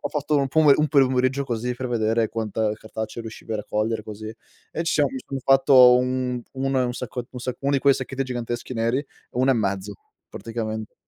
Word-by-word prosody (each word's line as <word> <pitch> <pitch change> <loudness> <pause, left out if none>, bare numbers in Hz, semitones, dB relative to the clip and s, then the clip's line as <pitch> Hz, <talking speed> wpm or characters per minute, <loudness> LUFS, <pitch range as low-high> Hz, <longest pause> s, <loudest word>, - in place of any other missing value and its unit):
ho - - -3
fatto 150 0 -1
un 140 -1 +1
pome 155 0 +5
un 150 0 +1
pomeriggio 130 -1 +2
così, 125 -1 -2
per 130 +1 -5
vedere 115 -1 +1
quanta 110 -1 -1
cartacce 110 +1 -6
riuscivi 110 0 -8
a 110 - 0
raccogliere, 105 +2 -2
così. 110 +1 -8 0.4
E 165 - -3
ci - - 0
siamo 145 -3 +2
mi 130 - -5
son 135 - -4
fatto 130 -2 +6
un 125 -1 -1
1 135 0 0
e 125 - +2
un 120 - -2
sacco 125 0 -6
1 125 +1 -10
sacco 125 0 -4
1 140 - +1
di 140 - +3
quei 140 0 +4
sacchetti 135 +1 -3
giganteschi 120 -1 -4
neri, 115 +5 0 0.3
1 130 +2 +2
e 130 - +4
mezzo, 100 -2 -2 0.4
praticamente. 110 -2 -5
125 Hz, 205 wpm, -23 LUFS, 110-135 Hz, 0.4 s, fatto